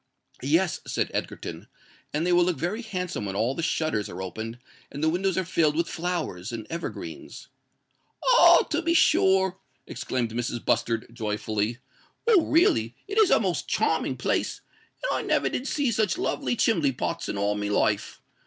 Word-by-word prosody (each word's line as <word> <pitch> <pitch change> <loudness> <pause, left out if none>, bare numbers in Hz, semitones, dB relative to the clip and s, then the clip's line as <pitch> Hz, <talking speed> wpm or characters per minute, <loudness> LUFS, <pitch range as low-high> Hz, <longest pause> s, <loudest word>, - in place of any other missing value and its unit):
"Yes," 160 +6 +1
said - - -1
Egerton: - - -5 0.4
"and 155 +3 -1
they 180 - +2
will 175 0 +5
look 175 -1 0
very 190 +7 -2
handsome 180 - -4
when 95 - -4
all 115 +5 +1
the 165 - -4
shutters 155 - -1
are 90 - -7
opened 110 +5 -5 0.3
and 145 +2 -5
the 160 - +4
windows 185 +2 0
are 190 - 0
filled 155 -4 +2
with 170 +1 +1
flowers 165 - -3
and 115 -2 -5
evergreens." 170 +1 -7 0.8
"Oh! - - +7
to 320 +2 +1
be 335 0 +1
sure," 190 - +4 0.3
exclaimed 120 -3 -3
Mrs. 120 0 -3
Bustard, 115 -1 +1
joyfully. 110 0 -2 0.5
"Well, 445 -6 +6
really, 345 +6 +3
it 410 +2 0
is 425 -4 +6
a - - +5
most - - -1
charming - - 0
place; - - -1 0.4
and - - 0
I - - -2
never - - +1
did 260 - -3
see 285 -5 0
such 215 - +1
lovely 300 -8 -1
chimbley 165 - +2
pots - - -3
in - - -3
all 100 +1 +1
my 105 0 -3
life. 105 0 0
165 Hz, 170 wpm, -26 LUFS, -, 0.8 s, Oh